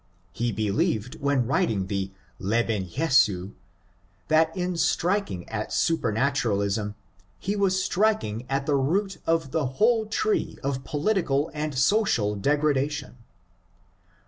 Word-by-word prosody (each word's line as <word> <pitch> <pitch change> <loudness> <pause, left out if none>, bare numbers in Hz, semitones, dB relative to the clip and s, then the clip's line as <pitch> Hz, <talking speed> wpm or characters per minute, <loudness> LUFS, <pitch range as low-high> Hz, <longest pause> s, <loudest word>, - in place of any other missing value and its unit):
He 120 +1 -1
believed 110 +2 -1
when 140 -3 +2
writing 110 -6 +1
the 95 0 -2 0.2
" - - -34
Leben 110 -5 0
Jesu 105 - +2 0.4
'' 90 +2 -38
that 160 +1 +4
in 180 0 -1
striking 170 - 0
at 110 -1 -4
supematuralism 110 -7 0 0.4
he 200 +2 -2
was 190 -2 +1
striking 180 - 0
at 135 0 -1
the 145 - +1
root 190 +9 0
of 165 -4 +1
the 155 -4 0
whole 225 -1 +3
tree 420 - 0
of 135 -1 -2
political 155 -2 0
and 150 -2 -3
social 135 - +2
degradation. 145 +2 0
140 Hz, 120 wpm, -26 LUFS, 110-165 Hz, 0.4 s, that